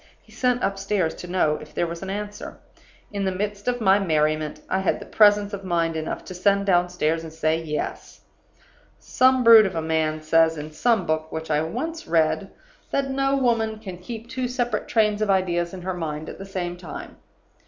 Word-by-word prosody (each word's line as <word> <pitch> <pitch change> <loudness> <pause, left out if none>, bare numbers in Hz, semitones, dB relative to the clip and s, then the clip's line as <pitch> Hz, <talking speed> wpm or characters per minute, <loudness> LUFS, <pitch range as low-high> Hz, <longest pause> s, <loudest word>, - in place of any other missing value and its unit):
He - - -23
sent 250 -1 0
upstairs 195 -3 0
to 180 - -9
know 175 -4 +1
if 150 - -13
there - - +1
was 170 0 -6
an 190 - -5
answer. 205 +1 -6 0.6
In 200 -1 -2
the 190 - 0
midst 205 +2 -4
of 245 0 0
my 200 -2 +4
merriment 155 -4 0
I 190 - 0
had 190 - -2
presence 205 -1 +4
of 195 -1 -5
mind 170 -3 0
enough 160 0 -4
to - - -8
send 200 +2 +2
downstairs 175 -3 +1
and 160 - -8
say 160 0 0
'Yes.' 150 -2 -5 0.8
"Some 260 0 +3
brute 225 -3 +9
of 190 - -6
a 165 - -1
man 160 -1 0
says, 165 +1 +3
in 150 +1 -6
some 220 +4 +1
book 155 0 -1
which 160 0 -5
I 150 0 +2
once 320 - -4
read, 165 +4 +1 0.4
that 275 -1 -1
no 275 +1 +1
woman 230 -4 +1
can 190 -5 -9
keep 225 +4 -8
two 255 +1 -3
separate 245 -1 -2
trains 215 -2 +2
of 215 - 0
ideas 175 -3 +1
in 185 -2 -8
her 185 +1 -2
mind 155 -3 -4
at - - -9
the 195 - -8
same 175 -2 -4
time. 175 -4 -9
185 Hz, 195 wpm, -24 LUFS, 160-215 Hz, 0.8 s, brute